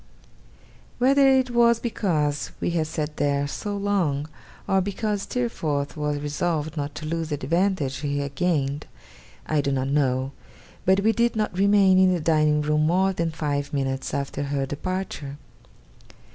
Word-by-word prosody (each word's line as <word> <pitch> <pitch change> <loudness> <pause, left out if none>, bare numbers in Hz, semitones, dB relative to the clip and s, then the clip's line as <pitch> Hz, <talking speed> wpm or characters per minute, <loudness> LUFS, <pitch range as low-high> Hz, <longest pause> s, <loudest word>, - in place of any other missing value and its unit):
Whether 275 +2 +5
it 260 -2 +3
was 235 -1 +4
because 155 - -1
we - - -1
had 160 -2 0
sat 155 -1 -4
there 140 -1 +1
so 205 +7 -4
long, 180 -8 0 0.4
or 195 0 +3
because 205 +1 -2
Steerforth 155 - -2
was 150 -1 -1
resolved 150 +1 -2
not 145 -1 -4
to 155 - -6
lose 165 0 -2
the 150 - 0
advantage 160 -1 0
he 145 -1 -2
had 140 -1 -3
gained, 145 -4 -1 0.6
I 155 -2 +1
do 140 - -1
not 135 0 -1
know; 135 -2 +1 0.5
but 190 +2 +4
we 220 +2 +4
did 235 +1 +1
not 215 -4 -1
remain 195 -1 +5
in 185 0 +5
the - - -1
dining 155 -1 +2
room 150 +1 +2
more 190 +3 +2
than 170 -2 -1
five 145 -3 -3
minutes 135 -1 -2
after 140 0 -3
her 140 -1 -1
departure. 145 -1 -4
155 Hz, 160 wpm, -24 LUFS, 145-195 Hz, 0.6 s, Whether